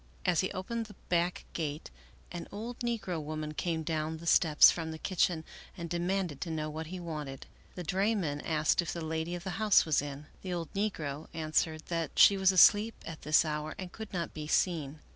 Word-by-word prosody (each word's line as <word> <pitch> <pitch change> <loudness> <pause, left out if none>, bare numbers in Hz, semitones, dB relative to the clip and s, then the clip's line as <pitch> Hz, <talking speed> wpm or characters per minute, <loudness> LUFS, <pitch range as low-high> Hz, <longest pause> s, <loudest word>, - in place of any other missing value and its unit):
As 180 -4 +3
he 190 - 0
opened 225 +4 -3
the 205 - -13
back 175 0 0
gate 155 -1 -4 0.4
an 175 -1 -6
old 230 +4 -6
negro 225 -9 -2
woman 155 0 -4
came 160 +1 -2
down 160 0 -2
the 165 - -11
steps 160 -2 +7
from 165 -2 -4
the 160 - -5
kitchen 175 -2 0 0.3
and 170 -1 -6
demanded 175 -3 -1
to 175 - -3
know 155 -1 -3
what 160 +1 -5
he 185 +2 -6
wanted. 150 -6 -6 0.3
The 180 - -5
drayman 185 -4 0
asked 155 +1 +2
if 170 - -4
the 170 -2 -4
lady 160 +2 -2
of 175 - -7
the 190 - -4
house 210 -3 +5
was 155 -4 +2
in. 145 0 -7 0.2
The 185 -2 -4
old 170 -3 -4
negro 160 -8 -2
an 155 -1 -4
swered 155 0 +1
that 165 -1 -2
she 200 - +8
was 190 -1 +4
asleep 205 +4 +6
at 165 -2 -7
this 155 +2 +4
hour 150 0 -3
and 185 -2 -7
could 220 0 -8
not 175 -3 -3
be 150 -1 -6
seen. 155 -3 0
165 Hz, 205 wpm, -31 LUFS, 155-185 Hz, 0.4 s, she